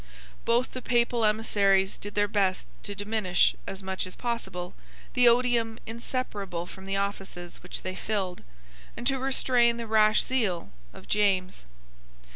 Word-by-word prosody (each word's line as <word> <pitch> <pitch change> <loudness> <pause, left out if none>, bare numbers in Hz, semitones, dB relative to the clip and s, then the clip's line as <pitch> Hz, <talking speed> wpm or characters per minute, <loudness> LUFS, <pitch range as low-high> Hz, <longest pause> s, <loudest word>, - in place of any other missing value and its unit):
Both 240 +2 +2
the 255 - -6
Papal 240 -1 +2
emissaries 200 -3 +3
did 205 0 -8
their 205 0 +3
best 195 -3 +1 0.2
to 205 - -5
diminish, 205 -3 +2
as 195 0 -6
much 190 -1 -3
as 185 - -5
possible, 225 -7 -4 0.4
the 250 -1 +5
odium 235 -2 +2
inseparable 215 -6 -4
from 190 +1 -11
the 195 0 -2
offices 195 -3 -4
which 180 - -5
they 185 - -3
filled, 190 -2 -2 0.6
and 240 - -6
to 270 +1 +1
restrain 250 -3 +3
the 235 - -4
rash 215 -1 +4
zeal 210 -10 -1 0.2
of - - -14
James. 190 - +1
210 Hz, 145 wpm, -28 LUFS, 190-235 Hz, 0.6 s, the